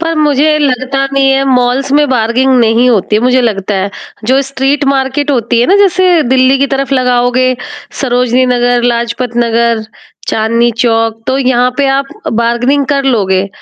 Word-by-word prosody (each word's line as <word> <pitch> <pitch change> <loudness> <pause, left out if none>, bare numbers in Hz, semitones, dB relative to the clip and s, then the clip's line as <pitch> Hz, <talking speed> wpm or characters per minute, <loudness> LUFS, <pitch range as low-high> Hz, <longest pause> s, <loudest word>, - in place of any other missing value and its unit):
पर 330 0 -2
मुझे 305 0 +2
लगता 270 -1 -1
नहीं 270 0 +2
है 270 0 +1
मॉल्स 255 +1 0
में 295 -1 +2
बार्गेनिंग 255 +2 +1
नहीं 230 +2 +2
होती 210 -1 0
है 220 - -1
मुझे 255 +1 +2
लगता 205 -3 -2
है, 195 +1 -2 0.3
जो 260 +4 +2
स्ट्रीट 275 +2 -1
मार्केट 275 +1 -1
होती 235 -2 0
है 245 - +2
ना 395 - +3
जैसे 370 -4 +2
दिल्ली 260 +1 +2
की 280 - +1
तरफ 275 0 -3
लगाओगे 250 0 +1 0.5
सरोजनी 250 -1 +1
नगर, 245 -1 +1
लाजपत 240 0 -2
नगर, 230 -1 0 0.4
चांदनी 230 +2 +1
चौक, 225 -1 0
तो 265 +1 0
यहाँ 250 -1 +1
पे 280 -1 +1
आप 275 0 -2 0.3
बार्गेनिंग 240 +5 0
कर 275 -1 -1
लोगे। 195 -6 0
255 Hz, 165 wpm, -10 LUFS, 235-275 Hz, 0.5 s, ना